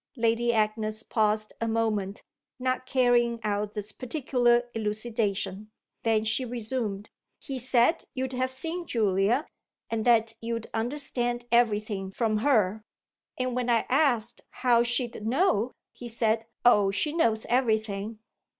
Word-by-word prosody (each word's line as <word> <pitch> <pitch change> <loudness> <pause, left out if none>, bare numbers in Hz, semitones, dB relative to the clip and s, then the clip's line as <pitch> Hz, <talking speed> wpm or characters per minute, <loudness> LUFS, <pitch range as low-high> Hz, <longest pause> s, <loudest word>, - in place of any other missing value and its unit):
Lady 230 +1 +2
Agnes 215 0 0
paused 215 -1 0
a 230 - 0
moment, 215 -3 -1 0.3
not 255 0 -1
carrying 245 -3 +2
out 205 0 -1
this 210 0 -5
particular 245 -2 +1
elucidation; 210 -2 -2 0.3
then 220 -1 +2
she 220 +4 0
resumed: 225 -4 -3 0.3
"He 270 -2 -4
said 250 +5 +2
you'd 260 0 -2
have 255 +1 0
seen 330 +6 -4
Julia 210 - +1 0.5
and 225 -1 -1
that 230 -2 +4
you'd 230 -1 -3
understand 240 0 -1
everything 210 -4 +1
from 215 +2 0
her. 215 -4 +2 0.6
And 255 -1 -1
when 250 -1 -1
I 235 -1 +3
asked 250 -5 +1
how 245 -2 +3
she'd 240 -2 -1
know 255 - +2 0.2
he 245 - -9
said, 225 -1 0 0.2
'Oh 210 -5 +6
she 295 +10 -1
knows 225 -10 +1
everything!'" 220 -3 0
230 Hz, 130 wpm, -27 LUFS, 215-250 Hz, 0.6 s, Oh